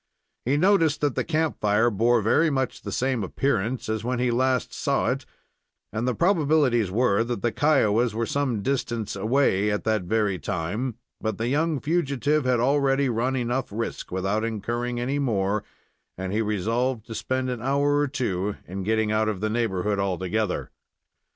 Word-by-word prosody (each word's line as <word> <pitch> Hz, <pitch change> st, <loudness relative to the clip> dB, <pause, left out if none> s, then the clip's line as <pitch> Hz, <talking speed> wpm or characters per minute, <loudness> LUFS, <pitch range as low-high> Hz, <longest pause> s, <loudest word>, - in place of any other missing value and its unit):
He 135 Hz, +4 st, +2 dB
noticed 165 Hz, -4 st, +3 dB
that 145 Hz, -3 st, +1 dB
the -, -, -1 dB
camp 160 Hz, -1 st, -1 dB
fire 105 Hz, +3 st, +3 dB
bore 115 Hz, +2 st, +2 dB
very 160 Hz, +9 st, +3 dB
much 130 Hz, -3 st, -2 dB
the -, -, -6 dB
same 130 Hz, -4 st, 0 dB
appearance 115 Hz, +3 st, -1 dB
as 110 Hz, 0 st, -2 dB
when 125 Hz, +1 st, -1 dB
he 125 Hz, 0 st, +1 dB
last 130 Hz, 0 st, +1 dB
saw -, -, 0 dB
it, -, -, -4 dB, 0.7 s
and 110 Hz, +3 st, -1 dB
the 125 Hz, -, 0 dB
probabilities 150 Hz, -, +2 dB
were 110 Hz, +1 st, +2 dB
that 120 Hz, -3 st, -4 dB
the 120 Hz, -, +2 dB
Kiowas 120 Hz, -5 st, +2 dB
were 115 Hz, +1 st, 0 dB
some 125 Hz, -6 st, -1 dB
distance 120 Hz, -5 st, -2 dB
away 105 Hz, -1 st, +2 dB
at 105 Hz, 0 st, -1 dB
that 110 Hz, -2 st, +1 dB
very 105 Hz, -2 st, 0 dB
time; 100 Hz, -, -3 dB, 0.3 s
but 110 Hz, 0 st, -2 dB
the 115 Hz, +2 st, -1 dB
young 155 Hz, +2 st, +1 dB
fugitive 150 Hz, -2 st, 0 dB
had 125 Hz, -2 st, +2 dB
already 135 Hz, +1 st, +2 dB
run 125 Hz, +3 st, 0 dB
enough 125 Hz, +1 st, -1 dB
risk, 115 Hz, +3 st, -4 dB
without 95 Hz, +4 st, -1 dB
incurring 120 Hz, +2 st, -2 dB
any 135 Hz, +4 st, -1 dB
more, 105 Hz, -5 st, 0 dB, 0.5 s
and 95 Hz, +1 st, -4 dB
he 110 Hz, -, +1 dB
resolved 110 Hz, +3 st, -1 dB
to 115 Hz, -, -7 dB
spend 130 Hz, +3 st, -2 dB
an 120 Hz, -2 st, -4 dB
hour 140 Hz, +3 st, +2 dB
or 145 Hz, -, +2 dB
two 105 Hz, -8 st, -2 dB
in 95 Hz, +2 st, -5 dB
getting 110 Hz, +2 st, +1 dB
out 110 Hz, 0 st, +2 dB
of 105 Hz, -4 st, -3 dB
the 110 Hz, +2 st, -1 dB
neighborhood 105 Hz, -3 st, 0 dB
altogether. 95 Hz, +1 st, -1 dB
120 Hz, 175 wpm, -25 LUFS, 105-135 Hz, 0.7 s, noticed